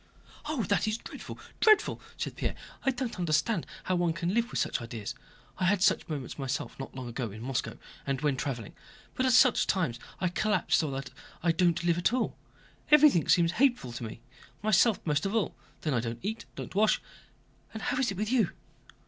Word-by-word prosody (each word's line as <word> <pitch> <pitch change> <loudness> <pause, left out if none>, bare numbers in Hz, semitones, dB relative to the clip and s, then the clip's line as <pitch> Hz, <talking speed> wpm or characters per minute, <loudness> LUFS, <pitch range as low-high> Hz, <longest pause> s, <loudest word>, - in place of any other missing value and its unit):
"Oh, 300 -6 -1
that 205 +2 +1
is 215 +1 0
dreadful, - - -9 0.2
dreadful!" 430 -2 +4 0.2
said - - -4
Pierre. - - -2 0.3
"I - - +3
don't 250 -5 -3
understand 170 +3 +1 0.2
how 185 - 0
one 175 -2 +1
can 170 +2 -2
live 235 +2 +1
with - - -2
such - - 0
ideas. 115 -3 -5 0.5
I 185 - +1
had 190 0 +3
such - - +3
moments 145 -3 -5
myself 135 0 -3
not 135 - -7
long 130 -2 -5
ago, 120 0 -3
in 110 +3 -9
Moscow 130 0 -2 0.3
and 135 -1 0
when 145 -2 +2
traveling, 125 -5 -4 0.4
but 260 - +1
at 255 - +4
such 250 -1 +5
times 150 -11 0 0.2
I 180 - +1
collapsed 195 0 +2
so 155 - 0
that 135 -1 -5 0.3
I 170 - +4
don't 170 0 +2
live 175 0 +2
at 175 +6 +2
all—everything 280 - +2
seems 170 -1 +5
hateful 240 - +2
to 120 0 -6
me... 115 +1 -7 0.4
myself 215 +1 +4
most 150 +3 +1
of 200 - -3
all. 220 - 0 0.3
Then 155 - -1
I 120 - +2
don't 115 0 -3
eat, 220 +3 -3
don't - - -7
wash... 210 +2 +3 0.7
and 220 -2 -7
how - - 0
is 265 - +2
it 195 - -4
with 215 +3 -1
you?..." 230 -8 +3
175 Hz, 200 wpm, -29 LUFS, 135-220 Hz, 0.7 s, such